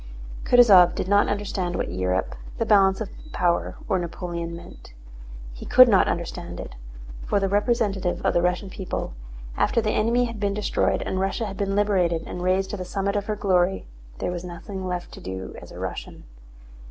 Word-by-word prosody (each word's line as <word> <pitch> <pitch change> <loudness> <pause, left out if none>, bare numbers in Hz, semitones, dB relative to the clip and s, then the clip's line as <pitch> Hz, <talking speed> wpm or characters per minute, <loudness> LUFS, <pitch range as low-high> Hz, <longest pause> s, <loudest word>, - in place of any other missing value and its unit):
Kutúzov 200 -8 +7
did - - -3
not 205 +1 +4
understand 195 -3 -2
what - - -2
Europe, 90 -6 -1 0.2
the - - 0
balance 195 0 +4
of 215 - -4 0.2
power, 175 -1 0
or 190 -4 +1
Napoleon 170 -1 -5
meant. 115 - -13 0.6
He - - -10
could 255 0 +7
not 200 -5 +4
understand 170 0 -4
it. - - -7 0.5
For 205 - +2
the 195 - 0
representative 200 -3 0
of - - +3
the 175 - +3
Russian 180 +2 -1
people, 185 - -4 0.4
after - - +2
the 215 -2 0
enemy 235 +3 +2
had 230 -2 -6
been 200 -1 0
destroyed 210 - 0
and 185 - -2
Russia 195 +4 -1
had 195 -2 -6
been 195 -1 -1
liberated 185 -5 +1
and 180 - -6
raised 185 +1 +1
to 210 - -4
the 185 - -4
summit 200 +2 -2
of 205 0 -2
her 215 - -1
glory, 190 -2 +1 0.3
there - - -2
was 175 -1 -5
nothing 185 +2 -7
left 180 -1 -4
to - - -11
do 95 0 -6
as - - -12
a - - -10
Russian. - - -6
190 Hz, 190 wpm, -24 LUFS, 175-205 Hz, 0.6 s, Kutúzov